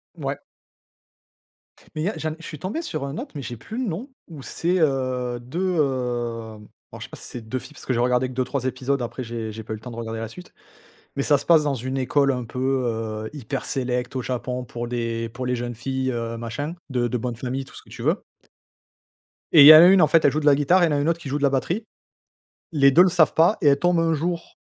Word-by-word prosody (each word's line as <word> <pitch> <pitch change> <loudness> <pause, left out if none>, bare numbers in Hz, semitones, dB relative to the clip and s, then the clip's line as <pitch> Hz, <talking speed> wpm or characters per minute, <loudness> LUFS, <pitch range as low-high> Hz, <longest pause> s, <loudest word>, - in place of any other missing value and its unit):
Ouais. - - -3 1.6
Mais 155 - -2
il - - -1
y - - +2
a 205 - -5
j'en 155 0 -2
ai - - -7
je 165 - -11
suis 150 - -8
tombé 205 - -3
sur 155 - -4
un 140 +3 -5
autre, - - -6
mais 145 - -4
j'ai 120 -3 -6
plus 220 - -8
le 255 - -1
nom. 205 - -5 0.2
Où 155 -5 -10
c'est, 175 +6 -1
heu, 130 -5 0
2, 175 +9 -2
hem 120 -6 -2 0.3
alors - - -9
je - - -5
sais - - -29
pas - - -10
si - - -11
c'est 125 - -7
2 110 +3 -4
filles 150 - -13
parce - - -13
que - - -1
j'ai 120 - 0
regardé 125 +1 +2
que - - -9
2-3 130 +1 -2
épisodes, 130 +1 -1
après 120 +2 -5
j'ai 115 -2 -5
j'ai 110 +1 -8
pas 110 - -6
eu 110 - -6
temps 125 - -8
de 115 - -9
regarder 115 -1 -5
la 115 - -5
suite. 180 +10 -13 0.6
Mais 140 - +1
ça 145 0 +4
se 140 - -7
passe 165 -3 +5
dans 145 -2 0
une 130 +2 -4
école 140 +1 +2
un 125 -2 -3
peu, 120 +2 -7 0.3
heu, 110 -1 -4
hyper 135 -2 -5
sélect 125 -1 -2
au 130 - -1
Japon 125 0 -3
pour 120 0 -6
des 115 -1 -2
pour 125 +3 -6
les 125 0 0
jeunes 120 0 -4
filles, 130 +2 -2
heu, 115 -1 -4
machin, 120 +8 -5
de 125 -2 0
de 125 - -1
bonne 120 0 -4
famille, 130 +3 -4
tout - - -16
ce - - -11
que - - -21
tu - - -10
veux. - - 0 1.3
Et 155 - +9
il - - +11
y 150 - +13
a 155 +2 +10
une, 190 0 +6
en 155 - +6
fait, 160 +2 +3
elle 145 - +5
joue 155 - 0
de 150 - -4
la 145 -1 +6
guitare 175 +6 +3
et - - +5
il - - -1
y - - +1
en - - +2
a - - +1
une 145 +3 +1
autre 170 0 0
qui 150 - -7
joue 140 - -1
de 145 - -4
la 140 - +5
batterie. 150 - -1 0.9
Les 140 -3 +5
2 165 +6 +7
le 185 - +5
savent 170 -3 +3
pas 170 +7 +4
et 150 - +4
elles 140 0 +4
tombent 175 0 +2
un 165 -1 +2
jour, 170 +2 -4
130 Hz, 275 wpm, -23 LUFS, 120-155 Hz, 1.6 s, y